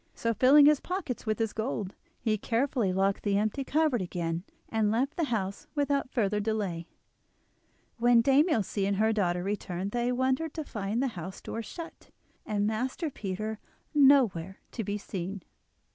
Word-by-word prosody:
So, 230 0 0
filling 270 +6 +7
his 300 -1 +6
pockets 350 - -4
with 215 -1 +1
the 225 - +2
gold, 220 -3 -3 0.3
he 220 -2 +1
carefully 230 -1 0
locked 195 +1 +1
the 200 -1 +1
empty 215 +6 0
cupboard 295 -5 +1
again 170 -1 -3 0.2
and 220 -2 +1
left 250 +7 0
the 335 - 0
house 215 +2 -3
without 285 -2 0
further 210 -5 0
delay. 200 -6 -2 1.1
When 240 0 +5
Dame 275 +7 +4
Ilse 215 - 0
and 200 +1 +1
her 220 +2 +2
daughter 180 -4 0
returned 195 -1 -3
they 240 +1 0
wondered 260 +5 0
to 315 - -3
find 215 -1 -2
the 270 - +1
house 185 -3 -7
door 230 - -5
shut, 330 +9 -9 0.4
and 205 -1 0
Master 255 +9 -2
Peter 215 0 -4 0.3
nowhere 250 - +4
to 225 - -3
be 205 +1 -2
seen. 195 -1 -5
220 Hz, 160 wpm, -29 LUFS, 195-265 Hz, 1.1 s, filling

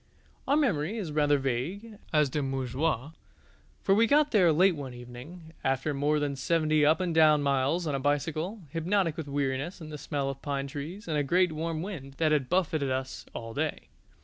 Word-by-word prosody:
Our 280 +2 +3
memory 205 - +1
is 185 -8 -4
rather 145 -1 +3
vague 165 - -3
as 150 -3 +3
to 150 - -1
Montjoie, 135 +1 -1 0.7
for 195 - +4
we 225 +3 +4
got 295 +3 +4
there 185 -7 +5
late 180 +3 +4
one 135 -4 -7
evening, 130 +8 -11
after 135 +3 0
more 145 +2 +1
than 145 -1 -1
seventy 155 +2 +2
up 155 +4 +4
and 180 -2 -1
down 155 -2 +5
miles 140 +5 +1
on 150 - -1
a 135 - 0
bicycle, 155 +8 -1
hypnotic 165 0 0
with 160 -3 -5
weariness 140 +4 -2
and 155 -2 -9
the 150 - -6
smell 140 -2 -2
of 135 0 -5
pine 140 -1 -2
trees 150 +9 -7
and 155 -2 0
a - - +1
great 180 +5 +3
warm 160 +1 -3
wind 145 -9 -7
that 155 +1 +1
had 145 -4 +1
buffeted 160 -6 +1
us 130 0 -4
all 115 -1 -6
day. 155 +3 -3
150 Hz, 195 wpm, -29 LUFS, 140-170 Hz, 0.7 s, there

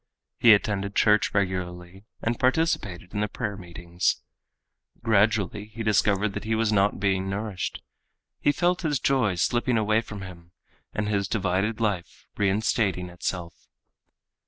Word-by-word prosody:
He 115 -2 +8
attended 100 -1 -2
church 105 -1 +4
regularly 90 -1 -3 0.2
and 115 +1 -1
participated 125 - 0
in 105 - -2
the 105 - +1
prayer 105 -1 -4
meetings. 85 -1 -2 0.8
Gradually 105 -1 +2
he 115 +1 -7
discovered 105 -1 +2
that - - -5
he 110 0 0
was 110 -1 +1
not 100 -1 +2
being 95 -1 0
nourished. 100 -2 -4 0.6
He - - +3
felt 175 +4 +1
his 150 -6 0
joy 120 -7 +2
slipping 120 +6 +1
away 110 0 +2
from 105 -3 -8
him 85 -2 -12 0.4
and 105 -1 -2
his 100 -2 0
divided 100 +2 0
life 100 -6 -2
reinstating 100 -2 +1
itself. 85 -1 -5
105 Hz, 135 wpm, -26 LUFS, 95-110 Hz, 0.8 s, He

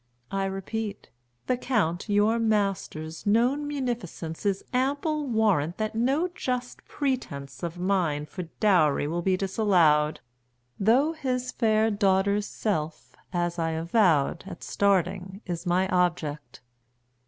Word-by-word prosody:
I 195 0 0
repeat, 200 +2 -4 0.3
The 250 - +1
Count 210 -8 -1
your 210 +3 +3
master's 195 -7 -1
known 250 +8 +2
munificence 235 - -4
Is 195 -1 0
ample 285 +4 0
warrant 205 - +1
that 215 0 -2
no 270 +9 +1
just 250 -5 -3
pretense 140 - -3
50 - - -2
Of 170 +1 -10
mine 175 -6 0
for 165 +5 -7 0.2
dowry 170 -10 +3
will 170 +3 -2
be 185 +1 +1
disallowed; 180 -7 +3 0.6
Though 250 +10 +4
his 255 -4 -2
fair 220 -1 +2
daughter's 200 0 +2
self, 160 -7 -3 0.2
as 175 -1 -1
I 165 -1 0
avowed 165 -2 +2
At 175 -3 -9
starting, 190 0 0
is 175 0 -4
my 180 +2 +2
object. 165 -5 -1
195 Hz, 125 wpm, -27 LUFS, 170-225 Hz, 0.6 s, Though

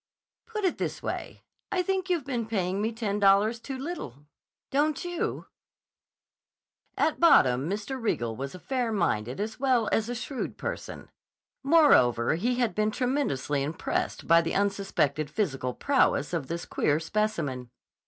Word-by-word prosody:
"Put 435 -2 -4
it 365 - 0
this - - -3
way; - - -5 0.3
I 370 -2 +1
think 380 0 -1
you've 340 -7 0
been 240 -5 -2
paying 195 -3 -1
me 220 +2 0
ten 215 -3 -2
dollars 205 +3 +4
too 265 +3 -6
little. 260 - -6 0.5
Don't 295 +3 +1
you?" 350 -1 -3 1.5
At 315 - +1
bottom 135 - +5
Mr. 215 +6 -4
Riegel 120 - -1
was 135 +7 -6
a - - -9
fair 250 +2 -1
minded 130 - -1
as 220 +3 -4
well 250 -5 +2
as 225 +1 +1
a 245 - -2
shrewd 255 +2 -5
person. - - -6 0.5
Moreover, 270 - +5
he 230 +10 0
had 240 -3 0
been 215 0 +1
tremendously 245 - -1
impressed 150 +4 -2
by 165 0 +6
the 165 - -3
unsuspected 195 -7 0
physical 135 - -2
prowess 260 - +2
of 160 -6 -2
this 170 +1 -4
queer 150 +1 +1
specimen. 160 - -2
215 Hz, 150 wpm, -28 LUFS, -, 1.5 s, by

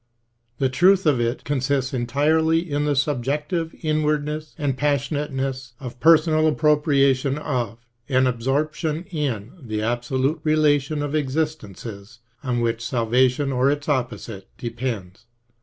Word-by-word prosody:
The 135 - +2
truth 180 +8 +4
of 140 -6 +3
it 120 +2 -1
con 145 -2 0
sists 135 0 0
entirely 155 +6 +2
in 145 -1 -1
the 145 -1 +1
subjective 150 +5 -1
inwardness 155 0 -1
and 140 -3 -1
passionateness 135 -3 -2
of 125 -2 -8
per 165 +3 +7
sonal 155 0 +1
appropriation 145 -3 +2
of 120 -6 -3 0.2
and 130 -1 +3
absorption 150 +6 -1
in 130 - -2
the 110 -4 -3
absolute 130 +6 0
relation 150 -1 +2
of 145 0 -3
existences 130 - -3 0.2
on 125 -3 -1
which 115 0 -1
salvation 125 +3 +1
or 130 +1 +2
its 145 0 -2
opposite 120 -7 -3
depends. 115 -6 -5
140 Hz, 125 wpm, -23 LUFS, 125-150 Hz, 0.2 s, per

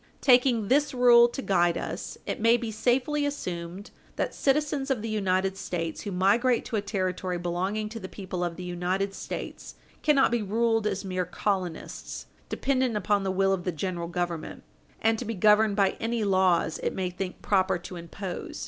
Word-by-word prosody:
Taking 245 -4 +4
this 285 +3 +2
rule 240 -1 +7
to 260 +3 -6
guide 175 -3 +2
us, - - -5
it - - -3
may 230 +2 +5
be 230 -2 -4
safely 260 +6 +1
assumed 185 -8 -4 0.2
that - - -2
citizens 285 0 0
of 250 -5 0
the 225 - -3
United 190 -2 0
States 165 -4 -4
who 205 - -5
migrate 220 +7 +2
to - - -4
a 210 - +1
Territory 185 -3 -2
belonging 185 +5 -2
to 225 +1 -7
the 185 - -7
people 185 -3 -5
of 175 -1 -2
the 180 - -7
United 180 +3 -1
States - - -7 0.3
cannot 290 -5 +4
be 240 -1 +1
ruled 225 +1 +1
as 195 -1 -2
mere 185 -1 -1
colonists, 180 -2 -3 0.2
dependent 260 -4 0
upon 205 0 +1
the 195 - -2
will 195 +1 +2
of 185 -2 -2
the 180 - -1
General 170 +1 -3
Government 175 -2 -4 0.4
and 225 0 +3
to - - -3
be 225 +1 -3
governed 210 +2 +4
by 195 -2 +3
any 225 0 -1
laws 185 -5 +2
it - - -2
may 185 -1 -2
think 180 0 -6
proper 190 -2 +2
to 175 +1 -9
impose. 175 +2 -6
200 Hz, 185 wpm, -27 LUFS, 180-230 Hz, 0.4 s, rule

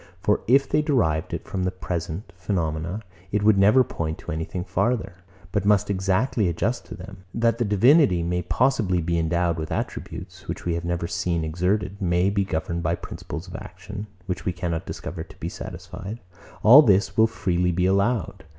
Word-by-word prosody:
For - - +1
if 135 +3 +5
they - - +2
derived 115 - +1
it - - -5
from 95 - -3
the 90 - +1
present 90 +1 -5
phenomena, 85 +1 -2 0.3
it 105 0 +1
would 105 -2 +5
never 105 +7 +6
point 80 -8 -4
to - - -7
anything 80 +3 -3
farther, 95 -1 -1 0.3
but - - 0
must 100 -1 +4
be - - +2
exactly 95 +4 +1
adjusted 100 +8 -1
to 115 - -7
them. 95 -1 -11
That 115 +1 +2
the 120 - +2
divinity 105 - +5
may 90 +1 0
possibly 100 -2 +1
be 85 0 0
endowed 85 0 +1
with 80 - -5
attributes, - - -5
which - - -5
we 85 - 0
have 85 0 -3
never 85 0 -1
seen 85 -1 -1
exerted; 90 +4 -1
may 90 +1 +2
be 100 -1 +1
governed 85 -1 -2
by 85 +1 0
principles 85 0 -7
of 90 - -9
action, 100 +3 -8 0.2
which 90 -3 -3
we 90 - -1
cannot 85 -2 -3
discover 85 -2 -5
to 85 - -16
be - - -3
satisfied: 95 +5 -7 0.4
all 125 +7 +10
this 100 -7 +3
will 110 0 +5
freely 90 -5 0
be 90 +1 +1
allowed. 100 -1 +1
95 Hz, 185 wpm, -24 LUFS, 85-105 Hz, 0.4 s, all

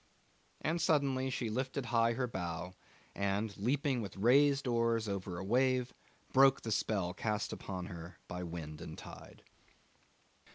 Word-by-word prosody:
And 165 +2 0
suddenly 135 -4 +2
she 120 -3 -2
lifted 130 +3 -2
high 115 -1 +3
her 125 +2 0
bow, 90 -5 -4 0.4
and, 100 +1 -1
leaping 130 +4 +1
with 100 -2 -6
raised 140 +6 +5
oars 115 -2 +1
over 95 -3 -3
a 90 - -4
wave, 125 +4 +2 0.4
broke 135 0 +6
the 115 - -3
spell 100 -4 0
cast 105 +1 -2
upon 90 -2 -5
her 85 -2 -8
by 90 - -5
the 90 - -4
wind 80 -3 -6
and - - -7
tide. - - -11
115 Hz, 150 wpm, -34 LUFS, 95-130 Hz, 0.4 s, broke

